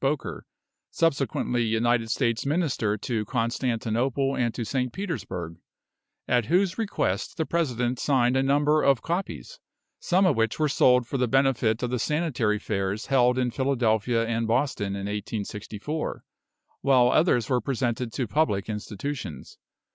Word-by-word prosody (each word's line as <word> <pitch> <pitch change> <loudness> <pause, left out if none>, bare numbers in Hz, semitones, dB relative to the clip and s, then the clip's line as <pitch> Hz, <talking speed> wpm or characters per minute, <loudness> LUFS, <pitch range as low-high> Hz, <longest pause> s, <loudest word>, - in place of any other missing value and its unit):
Boker, 135 +1 -2 0.4
subsequently 140 -6 0
United 115 +1 +1
States 115 -2 0
Minister 140 -9 0
to 110 +1 -2
Constantinople 125 +2 -1
and 120 -2 0
to 120 - -3
St. 125 +2 -1
Petersburg, 90 - -5 0.7
at 120 -2 +2
whose 185 +4 +2
request 215 -3 -1
the 160 - 0
President 125 -8 -1
signed 130 -3 +2
a 130 - +3
number 145 +3 +3
of 135 -4 +3
copies, 195 - -4 0.4
some 185 +2 +2
of 170 -7 +3
which 115 -1 0
were 155 - +2
sold 125 -3 +4
for 135 - -3
the 125 - +2
benefit 125 -4 +2
of 125 - -1
the 125 - -1
Sanitary 130 -8 0
Fairs 100 0 -2
held 125 -2 +3
in 125 -1 +1
Philadelphia 120 -3 +1
and 115 0 -1
Boston 110 -5 0
in 100 0 -4
1864, 105 +6 -4 0.6
while 125 -3 +4
others 155 -8 +3
were 125 -2 +1
presented 120 -1 -2
to 125 - -2
public 105 -6 0
institutions. 105 - -6
125 Hz, 140 wpm, -26 LUFS, 115-140 Hz, 0.7 s, sold